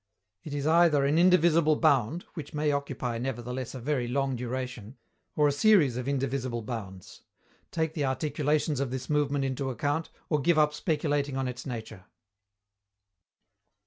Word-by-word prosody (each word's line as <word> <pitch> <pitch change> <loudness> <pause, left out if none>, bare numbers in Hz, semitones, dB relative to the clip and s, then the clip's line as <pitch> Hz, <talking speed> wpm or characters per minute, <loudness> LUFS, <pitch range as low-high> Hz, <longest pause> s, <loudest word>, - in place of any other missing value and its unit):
It 145 -2 -6
is 140 -1 -2
either 160 -3 +4
an 150 +4 +2
indivisible 170 -3 +4
bound 150 +1 +2
(which 155 -3 -8
may 150 0 +1
occupy, 130 -4 -3
nevertheless, 125 0 -4
a - - -5
very 125 -1 -1
long 135 +1 0
duration) 125 -1 -5 0.4
or 150 -1 +4
a - - +3
series 150 - +4
of 125 +1 -4
indivisible 130 -3 -2
bounds. 100 -6 -7 0.5
Take 160 -1 -1
the 150 -3 -1
articulations 145 +2 0
of 140 -2 -1
this 130 +2 -5
movement 145 -2 +1
into 135 0 -2
account, 145 +5 -2 0.2
or 150 -3 0
give 170 +3 +3
up 150 -1 +4
speculating 145 -3 -1
on 135 -1 -1
its 125 +2 -6
nature. 110 -6 -7
140 Hz, 150 wpm, -28 LUFS, 125-150 Hz, 0.5 s, either